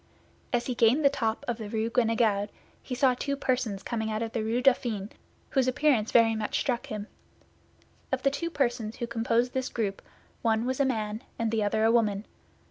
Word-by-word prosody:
As 240 Hz, -1 st, +1 dB
he 255 Hz, -, -1 dB
gained 245 Hz, +6 st, +3 dB
the 280 Hz, -, +6 dB
top 230 Hz, 0 st, -1 dB
of 240 Hz, -1 st, -2 dB
the 215 Hz, -2 st, -6 dB
Rue 220 Hz, +1 st, -1 dB
Guénegaud, 225 Hz, -4 st, +2 dB, 0.3 s
he 250 Hz, -, -5 dB
saw 260 Hz, 0 st, +4 dB
two 280 Hz, +3 st, -2 dB
persons 250 Hz, -7 st, -1 dB
coming 220 Hz, -2 st, -2 dB
out 215 Hz, +1 st, -1 dB
of 225 Hz, -, -4 dB
the 225 Hz, -, -2 dB
Rue 225 Hz, +3 st, 0 dB
Dauphine 240 Hz, -6 st, +1 dB, 0.4 s
whose 265 Hz, -2 st, +2 dB
appearance 255 Hz, -4 st, +2 dB
very 230 Hz, -1 st, +5 dB
much 215 Hz, -1 st, -1 dB
struck 245 Hz, -3 st, -1 dB
him. 210 Hz, -1 st, -5 dB, 1.1 s
Of 260 Hz, -1 st, -1 dB
the 275 Hz, -, +3 dB
two 335 Hz, +4 st, -3 dB
persons 240 Hz, -7 st, -1 dB
who 235 Hz, -, -3 dB
composed 235 Hz, +1 st, 0 dB
this 260 Hz, -1 st, -1 dB
group, 205 Hz, -4 st, -2 dB, 0.4 s
one 225 Hz, 0 st, +1 dB
was 260 Hz, +1 st, -1 dB
a 280 Hz, -, +4 dB
man 215 Hz, -4 st, -2 dB, 0.2 s
and 230 Hz, -1 st, 0 dB
the 225 Hz, -1 st, +1 dB
other 210 Hz, +1 st, +1 dB
a 225 Hz, -, +5 dB
woman. 215 Hz, -3 st, +2 dB
230 Hz, 200 wpm, -28 LUFS, 220-255 Hz, 1.1 s, the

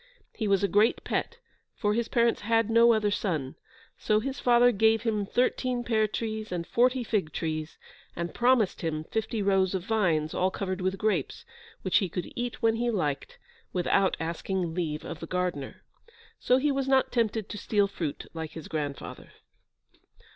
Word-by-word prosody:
He 220 Hz, -, -2 dB
was 200 Hz, -1 st, +2 dB
a -, -, +4 dB
great 210 Hz, +3 st, +3 dB
pet, 470 Hz, -, -2 dB, 0.4 s
for 210 Hz, -2 st, 0 dB
his 235 Hz, +1 st, 0 dB
parents 235 Hz, -1 st, +2 dB
had 225 Hz, +1 st, +1 dB
no 230 Hz, +1 st, +6 dB
other 215 Hz, -2 st, +2 dB
son, 155 Hz, -10 st, -2 dB, 0.5 s
so 215 Hz, -1 st, +2 dB
his 270 Hz, +4 st, -4 dB
father 245 Hz, 0 st, +5 dB
gave 220 Hz, +1 st, +3 dB
him 210 Hz, -4 st, -1 dB
thirteen 250 Hz, +1 st, 0 dB
pear 220 Hz, -3 st, +2 dB
trees, 220 Hz, 0 st, -4 dB
and 175 Hz, -2 st, -3 dB
forty 250 Hz, +4 st, +2 dB
fig 205 Hz, -8 st, -1 dB
trees, 155 Hz, 0 st, -4 dB, 0.4 s
and 170 Hz, 0 st, -4 dB
promised 240 Hz, -4 st, +2 dB
him 155 Hz, -2 st, -2 dB
fifty 220 Hz, +3 st, -2 dB
rows 195 Hz, -1 st, +2 dB
of 185 Hz, -, -2 dB
vines, 170 Hz, -9 st, +1 dB
all 185 Hz, -, +1 dB
covered 190 Hz, 0 st, -4 dB
with 185 Hz, +1 st, -1 dB
grapes, 195 Hz, -9 st, -1 dB, 0.4 s
which 185 Hz, -, +3 dB
he 190 Hz, -, +1 dB
could 175 Hz, +1 st, -5 dB
eat 240 Hz, 0 st, -4 dB
when 225 Hz, 0 st, +3 dB
he 240 Hz, +1 st, 0 dB
liked, 150 Hz, -11 st, -2 dB, 0.4 s
without 190 Hz, +1 st, +2 dB
asking 170 Hz, +1 st, -2 dB
leave 160 Hz, -3 st, -3 dB
of 165 Hz, -, -6 dB
the 165 Hz, -, -7 dB
gardener. 180 Hz, -7 st, -3 dB, 0.6 s
So 250 Hz, -, +3 dB
he 285 Hz, +2 st, +2 dB
was 270 Hz, -1 st, -1 dB
not 265 Hz, -1 st, +3 dB
tempted 220 Hz, -3 st, 0 dB
to -, -, -6 dB
steal 205 Hz, 0 st, +2 dB
fruit, 165 Hz, -7 st, -4 dB
like 160 Hz, -2 st, -6 dB
his 160 Hz, -, -8 dB
grandfather. 145 Hz, -3 st, -5 dB
205 Hz, 175 wpm, -28 LUFS, 175-230 Hz, 0.6 s, no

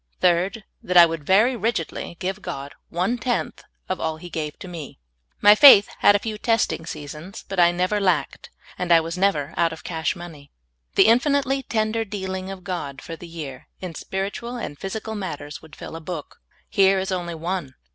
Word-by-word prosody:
Third, 180 Hz, +5 st, +2 dB, 0.2 s
that 180 Hz, 0 st, +1 dB
I 170 Hz, -, +11 dB
would 165 Hz, -2 st, -4 dB
very 220 Hz, +7 st, +4 dB
rigidly 210 Hz, -6 st, -3 dB
give 190 Hz, +3 st, -3 dB
God 140 Hz, -3 st, -6 dB, 0.2 s
one 185 Hz, +8 st, -1 dB
tenth 240 Hz, +1 st, -2 dB, 0.2 s
of 185 Hz, -, -2 dB
all 160 Hz, -1 st, -2 dB
He 175 Hz, +1 st, -10 dB
gave 150 Hz, -2 st, -4 dB
to -, -, -9 dB
me. 165 Hz, -6 st, -8 dB, 0.4 s
My 205 Hz, 0 st, +9 dB
faith 210 Hz, -4 st, +9 dB
had 205 Hz, -, +6 dB
a 205 Hz, -, -1 dB
few 215 Hz, -1 st, -4 dB
testing 225 Hz, -8 st, 0 dB
seasons, 155 Hz, +6 st, -8 dB
but 195 Hz, -, -3 dB
I 175 Hz, 0 st, +6 dB
never 185 Hz, +4 st, 0 dB
lacked, 180 Hz, -8 st, 0 dB, 0.3 s
and 180 Hz, -1 st, -1 dB
I 165 Hz, -, +8 dB
was 165 Hz, +1 st, -4 dB
never 180 Hz, -6 st, +1 dB
out 170 Hz, -1 st, +3 dB
of 160 Hz, -, -9 dB
cash 160 Hz, -2 st, -2 dB
mone3^ 165 Hz, -5 st, -11 dB, 0.5 s
The -, -, +6 dB
infinitel}^ 270 Hz, +3 st, +3 dB
tender 220 Hz, 0 st, 0 dB
deal 190 Hz, -3 st, -5 dB
ings 190 Hz, 0 st, -5 dB
of 190 Hz, -1 st, -8 dB
God 155 Hz, -7 st, -4 dB
for 165 Hz, -, -7 dB
the 170 Hz, 0 st, -12 dB
3'ear, 140 Hz, -6 st, -7 dB
in 180 Hz, -3 st, -6 dB
spiritual 200 Hz, +8 st, -4 dB
and 145 Hz, -, -5 dB
physical 220 Hz, +3 st, -5 dB
matters, 150 Hz, -8 st, -6 dB
would 160 Hz, -1 st, -14 dB
fill -, -, -8 dB
a 165 Hz, -, -7 dB
book. 160 Hz, -2 st, -7 dB, 0.3 s
Here 195 Hz, 0 st, +4 dB
is 190 Hz, 0 st, -2 dB
only 175 Hz, -2 st, -3 dB
one. 165 Hz, -4 st, -4 dB
180 Hz, 195 wpm, -23 LUFS, 165-205 Hz, 0.5 s, I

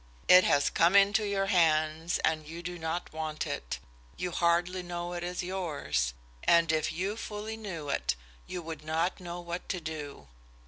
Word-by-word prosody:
It 180 Hz, 0 st, +9 dB
has 145 Hz, -, +3 dB
come 170 Hz, +4 st, +4 dB
into 200 Hz, +2 st, +6 dB
your 195 Hz, -1 st, +1 dB
hands 160 Hz, -2 st, +2 dB
and 155 Hz, -1 st, 0 dB
you 165 Hz, +2 st, -7 dB
do 175 Hz, 0 st, -5 dB
not 160 Hz, +1 st, -3 dB
want 155 Hz, -1 st, -3 dB
it. -, -, -4 dB, 0.4 s
You 180 Hz, -, -2 dB
hardly 175 Hz, +2 st, +2 dB
know 175 Hz, 0 st, -4 dB
it 175 Hz, 0 st, -4 dB
is 180 Hz, 0 st, -3 dB
yours; 165 Hz, -, -1 dB, 0.3 s
and 170 Hz, -1 st, +5 dB
if 155 Hz, -1 st, +1 dB
you 190 Hz, +5 st, -2 dB
fully 215 Hz, 0 st, -5 dB
knew 185 Hz, -9 st, -6 dB
it 140 Hz, -, 0 dB, 0.3 s
you 175 Hz, -, -5 dB
would 160 Hz, -2 st, -7 dB
not 160 Hz, +4 st, 0 dB
know 175 Hz, -1 st, -6 dB
what 175 Hz, +1 st, -6 dB
to 180 Hz, -, -1 dB
do! 150 Hz, -, -6 dB
170 Hz, 175 wpm, -30 LUFS, 160-180 Hz, 0.4 s, It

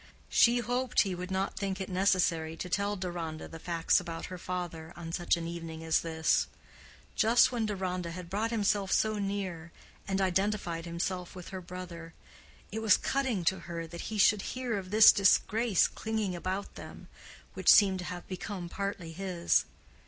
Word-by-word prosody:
She 240 Hz, +1 st, +5 dB
hoped 245 Hz, +1 st, +1 dB
he 195 Hz, -4 st, -1 dB
would 180 Hz, +1 st, -5 dB
not 190 Hz, +1 st, -1 dB
think 195 Hz, -1 st, -2 dB
it 190 Hz, -, -3 dB
necessary 180 Hz, -4 st, +1 dB
to -, -, -5 dB
tell 200 Hz, +2 st, 0 dB
Deronda 175 Hz, -4 st, -5 dB
the 165 Hz, -, -10 dB
facts 165 Hz, 0 st, +2 dB
about 165 Hz, -1 st, -6 dB
her 180 Hz, -, -7 dB
father 175 Hz, -3 st, -5 dB
on 165 Hz, -1 st, -7 dB
such 175 Hz, 0 st, +1 dB
an 165 Hz, 0 st, -4 dB
evening 165 Hz, -1 st, -6 dB
as 160 Hz, -1 st, +2 dB
this. 160 Hz, -1 st, +1 dB, 0.7 s
Just 235 Hz, +3 st, +5 dB
when 230 Hz, -3 st, -1 dB
Deronda 185 Hz, -4 st, -3 dB
had 175 Hz, +1 st, -7 dB
brought 210 Hz, +5 st, -1 dB
himself 205 Hz, -3 st, 0 dB
so 215 Hz, -1 st, +2 dB
near, 190 Hz, -5 st, -3 dB, 0.4 s
and 195 Hz, 0 st, 0 dB
identified 190 Hz, -3 st, 0 dB
himself 175 Hz, +2 st, -3 dB
with 180 Hz, -2 st, -9 dB
her 190 Hz, -1 st, -6 dB
brother, 175 Hz, -2 st, -9 dB, 0.6 s
it 220 Hz, -, -3 dB
was 220 Hz, -3 st, +5 dB
cutting 260 Hz, -10 st, -1 dB
to 190 Hz, +2 st, +2 dB
her 165 Hz, -1 st, -4 dB
that 170 Hz, +1 st, -8 dB
he 220 Hz, -, -4 dB
should 205 Hz, 0 st, +5 dB
hear 250 Hz, +1 st, -3 dB
of 190 Hz, -2 st, -5 dB
this 215 Hz, +2 st, +9 dB
disgrace 210 Hz, +1 st, +3 dB
clinging 220 Hz, -4 st, -3 dB
about 185 Hz, +3 st, -4 dB
them, -, -, -10 dB, 0.5 s
which -, -, +1 dB
seemed 190 Hz, -3 st, +7 dB
to 180 Hz, -, -5 dB
have 175 Hz, -1 st, -6 dB
become 185 Hz, -1 st, -5 dB
partly 195 Hz, -3 st, -4 dB
his. 175 Hz, 0 st, +1 dB
185 Hz, 175 wpm, -30 LUFS, 170-205 Hz, 0.7 s, this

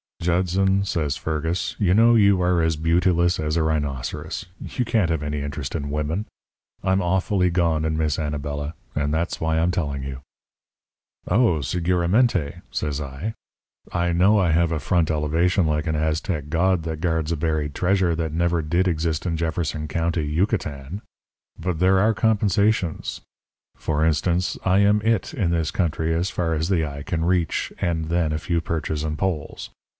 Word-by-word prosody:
"'Judson,' 95 Hz, +3 st, +1 dB
says 75 Hz, -7 st, -1 dB
Fergus, 80 Hz, +3 st, -2 dB
'you 95 Hz, -4 st, +3 dB
know 115 Hz, +2 st, +6 dB
you 100 Hz, -4 st, +4 dB
are 90 Hz, -1 st, +2 dB
as 80 Hz, 0 st, +1 dB
beautiless 85 Hz, +2 st, +2 dB
as 75 Hz, +1 st, -1 dB
a 80 Hz, -, +2 dB
rhinoceros. 75 Hz, -5 st, -2 dB
You 125 Hz, -, -3 dB
can't 110 Hz, -6 st, +1 dB
have 80 Hz, -3 st, -1 dB
any 75 Hz, 0 st, -2 dB
interest 70 Hz, -1 st, -4 dB
in 70 Hz, -3 st, -3 dB
women. 75 Hz, +7 st, -2 dB, 0.6 s
I'm 95 Hz, +1 st, +2 dB
awfully 90 Hz, +1 st, +1 dB
gone 85 Hz, -3 st, +1 dB
in 80 Hz, 0 st, -1 dB
Miss 80 Hz, -2 st, 0 dB
Anabela. 75 Hz, -1 st, -3 dB, 0.2 s
And 75 Hz, 0 st, 0 dB
that's 85 Hz, +2 st, -2 dB
why 80 Hz, 0 st, +1 dB
I'm 85 Hz, +2 st, +2 dB
telling 70 Hz, -7 st, -2 dB
you.' 70 Hz, 0 st, -6 dB, 1.1 s
"'Oh, 95 Hz, -10 st, +3 dB
seguramente,' 90 Hz, -, +1 dB
says 75 Hz, 0 st, -2 dB
I. 70 Hz, +10 st, -5 dB, 0.6 s
'I 85 Hz, 0 st, 0 dB
know 95 Hz, +5 st, +4 dB
I 90 Hz, -4 st, +2 dB
have 85 Hz, +1 st, +2 dB
a 80 Hz, -, -1 dB
front 85 Hz, +2 st, +1 dB
elevation 80 Hz, +4 st, +1 dB
like 75 Hz, +1 st, 0 dB
an 80 Hz, -, 0 dB
Aztec 80 Hz, 0 st, -1 dB
god 85 Hz, +2 st, +2 dB
that 80 Hz, -1 st, -4 dB
guards 80 Hz, -2 st, 0 dB
a 85 Hz, -, 0 dB
buried 75 Hz, -2 st, -1 dB
treasure 90 Hz, -2 st, +2 dB
that 80 Hz, -2 st, -3 dB
never 85 Hz, 0 st, +1 dB
did 85 Hz, +5 st, +1 dB
exist 80 Hz, -1 st, -1 dB
in 85 Hz, -2 st, -1 dB
Jefferson 80 Hz, -1 st, -2 dB
County, 85 Hz, +1 st, -1 dB
Yucatan. 80 Hz, -1 st, -2 dB, 0.6 s
But 90 Hz, -4 st, -2 dB
there 95 Hz, +1 st, +4 dB
are 110 Hz, +3 st, +3 dB
compensations. 105 Hz, -4 st, +1 dB, 0.5 s
For 80 Hz, 0 st, 0 dB
instance, 85 Hz, +3 st, +1 dB
I 95 Hz, +1 st, +4 dB
am 105 Hz, +1 st, +4 dB
It 115 Hz, +7 st, 0 dB
in 105 Hz, -, 0 dB
this 80 Hz, -2 st, 0 dB
country 80 Hz, -2 st, 0 dB
as 85 Hz, +3 st, 0 dB
far 85 Hz, -3 st, -1 dB
as 80 Hz, +2 st, -1 dB
the 85 Hz, -5 st, +2 dB
eye 70 Hz, -1 st, -6 dB
can 80 Hz, +1 st, -2 dB
reach, 85 Hz, -2 st, 0 dB
and 80 Hz, -2 st, -1 dB
then 85 Hz, -1 st, 0 dB
a 75 Hz, -, -1 dB
few 85 Hz, 0 st, -1 dB
perches 80 Hz, -2 st, -2 dB
and 75 Hz, -1 st, -2 dB
poles. 90 Hz, -5 st, -3 dB
85 Hz, 170 wpm, -23 LUFS, 75-90 Hz, 1.1 s, know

